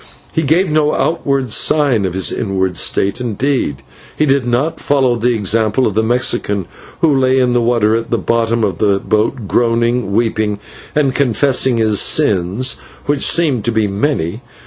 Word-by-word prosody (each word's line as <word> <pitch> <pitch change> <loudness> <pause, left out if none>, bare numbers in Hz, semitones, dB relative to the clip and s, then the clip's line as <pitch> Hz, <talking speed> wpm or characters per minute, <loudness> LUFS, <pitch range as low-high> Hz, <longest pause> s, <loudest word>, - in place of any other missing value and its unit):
He 160 - -1
gave 160 +4 +1
no 150 -1 +1
outward 140 -6 -1
sign 135 -6 +2
of 90 -1 -3
his 95 - +2
inward 95 -3 -2
state 100 +6 0
indeed; 120 - -2 0.3
he 155 - +2
did 135 -3 +1
not 130 +7 -1
follow 135 -4 +1
the 120 +1 0
example 110 +4 +1
of 105 - -1
the 110 - +1
Mexican, 110 -4 0 0.4
who 155 -4 +3
lay 130 0 +2
in 125 -2 +2
the 120 - +2
water 115 -2 +1
at 115 0 -3
the 115 - 0
bottom 115 0 0
of 95 -5 -2
the 100 -2 +2
boat, 110 +3 -1
groaning, 115 -1 0
weeping, 110 -1 0 0.4
and 140 -3 +1
confessing 130 -1 +1
his 110 -2 +2
sins, 105 - +1 0.3
which 145 0 -1
seemed 145 -10 +2
to 120 - +1
be 110 -1 +1
many. 100 - -2
120 Hz, 170 wpm, -15 LUFS, 105-135 Hz, 0.4 s, who